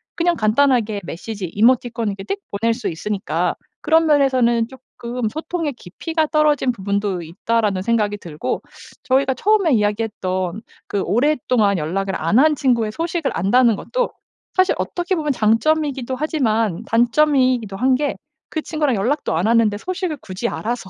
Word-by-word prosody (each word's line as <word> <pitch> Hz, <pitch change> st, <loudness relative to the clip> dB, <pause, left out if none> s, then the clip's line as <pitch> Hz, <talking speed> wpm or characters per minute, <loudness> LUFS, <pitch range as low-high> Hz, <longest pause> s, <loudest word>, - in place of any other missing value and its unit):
그냥 345 Hz, 0 st, +1 dB
간단하게 220 Hz, -3 st, +2 dB
메시지, 200 Hz, +3 st, -6 dB
이모티콘을 230 Hz, +2 st, +1 dB
이렇게 195 Hz, -, -3 dB
띡 -, -, -32 dB
보낼 225 Hz, +3 st, +1 dB
수 245 Hz, -, -4 dB
있으니까 200 Hz, +5 st, -2 dB, 0.3 s
그런 325 Hz, 0 st, +3 dB
면에서는 255 Hz, -5 st, +3 dB
쪼끔 245 Hz, -3 st, -6 dB
'소통의 315 Hz, 0 st, -3 dB
깊이가 315 Hz, -, -3 dB
떨어진 300 Hz, -4 st, +2 dB
부분도 200 Hz, -3 st, -2 dB
있다.'라는 200 Hz, +3 st, -1 dB
생각이 210 Hz, -2 st, +1 dB
들고. 160 Hz, -5 st, -4 dB, 0.4 s
저희가 265 Hz, 0 st, +2 dB
처음에 390 Hz, -, +2 dB
이야기했던 205 Hz, -3 st, -1 dB, 0.3 s
그 200 Hz, -, -1 dB
오랫동안 240 Hz, -5 st, +2 dB
연락을 190 Hz, +5 st, -2 dB
안 170 Hz, +10 st, +3 dB
한 305 Hz, +1 st, +4 dB
친구의 235 Hz, -6 st, +1 dB
소식을 330 Hz, +1 st, -2 dB
안다는 230 Hz, +5 st, +3 dB
것도 -, -, -2 dB, 0.5 s
사실 370 Hz, 0 st, +4 dB
어떻게 355 Hz, +1 st, -1 dB
보면 300 Hz, -3 st, -1 dB
장점이기도 260 Hz, +3 st, +1 dB
하지만 225 Hz, -, 0 dB
단점이기도 245 Hz, -3 st, +2 dB
한 260 Hz, +2 st, +3 dB
게 290 Hz, +2 st, -1 dB, 0.3 s
그 315 Hz, -, -3 dB
친구랑 300 Hz, -7 st, 0 dB
연락도 240 Hz, -, 0 dB
안 175 Hz, +5 st, 0 dB
하는데 225 Hz, -2 st, +3 dB
소식을 365 Hz, -, -3 dB
굳이 190 Hz, +5 st, -4 dB
알아서 230 Hz, -5 st, -4 dB
235 Hz, 365 characters per minute, -20 LUFS, 205-295 Hz, 0.5 s, 한